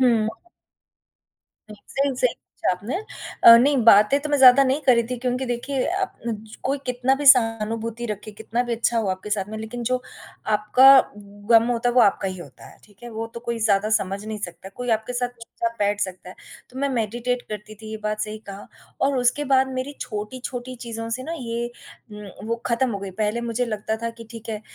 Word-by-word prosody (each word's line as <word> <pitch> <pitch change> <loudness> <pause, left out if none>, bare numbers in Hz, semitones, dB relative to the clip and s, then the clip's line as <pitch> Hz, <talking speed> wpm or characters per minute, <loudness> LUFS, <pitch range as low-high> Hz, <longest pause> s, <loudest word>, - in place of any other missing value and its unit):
हुँ। 230 -4 +3 1.4
हुँ, 210 - -10
सही 275 0 0
सही 250 -1 +1
पूछा - - -4
आपने 205 - -3 0.5
अ, 230 - +11
नहीं 275 +4 +4
बातें 210 +4 +6
तो 300 - -5
मैं 290 - +3
ज़्यादा 260 +1 +8
नहीं 265 +3 +1
कर 255 - +5
रही 235 - +3
थी 250 - -2
क्योंकि 250 +1 -2
देखिए 250 +2 -2 0.2
अब 230 - -4 0.2
कोई 275 +2 0
कितना 250 +1 +1
भी 285 +1 -4
सहानुभूति 230 -2 +3
रखे, 210 0 -6
कितना 230 +3 -3
भी 240 -1 -4
अच्छा 230 0 0
हो 220 - -1
आपके 190 +3 -4
साथ 205 -2 0
में, 220 - -6
लेकिन 220 +2 -6
जो 255 0 +1 0.6
आपका 230 +6 +5 0.3
ग़म 205 +3 +2
होता 240 0 0
है, 240 - -1
वो 250 - +6
आपका 200 -3 +3
ही 185 -1 -6
होता 175 - -12
है, - - -18
ठीक 205 +1 -24
है? 240 - -8
वो 225 +1 -4
तो 235 - -6
कोई 235 -1 -3
ज़्यादा 215 -1 +1
समझ 200 -1 0
नहीं 215 -1 -5
सकता, 180 -1 -7
कोई 245 +5 -5
आपके 220 +2 0
साथ 245 0 -1
चुपचाप 230 0 -4
बैठ 205 0 0
सकता 185 -1 -4
है, - - -12 0.4
तो 255 - -9
मैं 280 +1 0
मेडिटेट 240 0 -2
करती 210 0 -7
थी, 215 +1 -11
ये 220 - -4
बात 215 0 -2
सही 215 0 -4
कहा 200 +1 -8 0.3
और 275 0 +2
उसके 250 +4 +1
बाद 265 0 +4
मेरी 260 +2 -4
छोटी-छोटी 245 +3 -6
चीज़ों 225 0 -5
से 255 +3 -3
ना 325 - -5
ये 235 -1 -4 0.4
उम, 210 0 -10
वो 230 - -1
ख़त्म 245 +2 +1
हो 200 - -3
गई, 195 -1 -6
पहले 215 +4 -1
मुझे 235 +1 -1
लगता 220 0 -3
था 230 - -1
कि 230 - -9
ठीक 230 -1 -10
है, 215 -1 -4
230 Hz, 215 wpm, -23 LUFS, 210-250 Hz, 1.4 s, अ